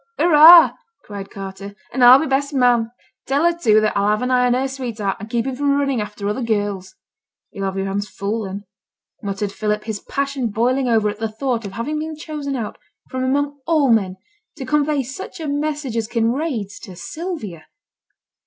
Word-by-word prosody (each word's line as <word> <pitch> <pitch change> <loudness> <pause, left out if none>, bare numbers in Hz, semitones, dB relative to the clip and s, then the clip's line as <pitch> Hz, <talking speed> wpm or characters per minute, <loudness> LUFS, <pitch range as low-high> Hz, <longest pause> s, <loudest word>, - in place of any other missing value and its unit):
'Hurra!' 330 +1 +8 0.3
cried 200 -2 -8
Carter, 195 +1 -8 0.2
'and 255 0 +1
I'll 245 +2 +10
be 320 - -1
best 280 +1 -1
man. 245 -3 +3 0.4
Tell 280 +3 +1
her, 345 0 +3
too 220 -11 +4
that 215 -1 0
I'll 200 +1 +2
have 215 +3 +1
an 250 - -1
eye 250 0 +3
on 245 - +2
her 265 +2 0
sweetheart, 235 -7 -4
and 215 +2 -8
keep 235 0 -1
him 265 -1 -3
from 280 +1 +1
running 275 -5 0
after 210 -1 -5
other 210 +5 -2
girls.' 205 -4 -2 0.6
'Yo'll 195 - -4
have 195 0 -3
yo'r 195 - -1
hands 200 +1 -3
full, 210 +2 -3
then,' 195 +1 -6 0.6
muttered 200 0 -3
Philip, 210 +1 -2
his 215 -2 -4
passion 275 -1 -2
boiling 245 +5 0
over 220 -2 +3
at 210 0 -4
the 225 0 -2
thought 230 0 -2
of 195 - -7
having 295 +7 -3
been 315 0 -5
chosen 300 -2 -5
out 225 -5 -5 0.3
from 255 0 -2
among 285 +2 -1
all 305 -6 +3
men 195 -5 +2 0.4
to 270 - -6
convey 295 +1 +1
such 280 +10 -8
a 315 - -4
message 290 -3 -2
as 225 -2 -1
Kinraid's 230 - -2
to 190 -5 -11
Sylvia. 220 - -6
240 Hz, 195 wpm, -20 LUFS, 210-280 Hz, 0.6 s, I'll